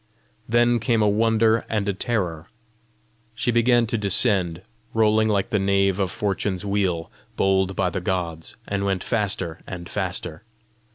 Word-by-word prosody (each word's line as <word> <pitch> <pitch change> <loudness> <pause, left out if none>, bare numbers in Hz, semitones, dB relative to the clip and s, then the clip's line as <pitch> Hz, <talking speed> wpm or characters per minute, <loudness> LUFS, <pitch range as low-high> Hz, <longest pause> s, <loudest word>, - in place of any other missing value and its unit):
Then 120 +1 +3
came 115 0 +1
a - - +3
wonder 110 +1 +3
and 105 -2 -1
a 100 - +1
terror: 90 -7 -2 0.9
she 120 +2 0
began 120 0 +3
to 115 0 -2
descend 95 -4 +1 0.3
rolling 110 0 +3
like 100 -2 0
the 105 - +2
nave 100 0 +2
of 95 -2 +1
Fortune's 95 0 -2
wheel 95 -5 -1 0.2
bowled 95 0 +1
by 90 -2 0
the 95 - -3
gods, 85 -3 -3
and 100 -1 -2
went 95 -2 -1
faster 95 -7 -2
and 85 -2 -7
faster. 80 +2 -3
100 Hz, 150 wpm, -23 LUFS, 95-110 Hz, 0.9 s, Then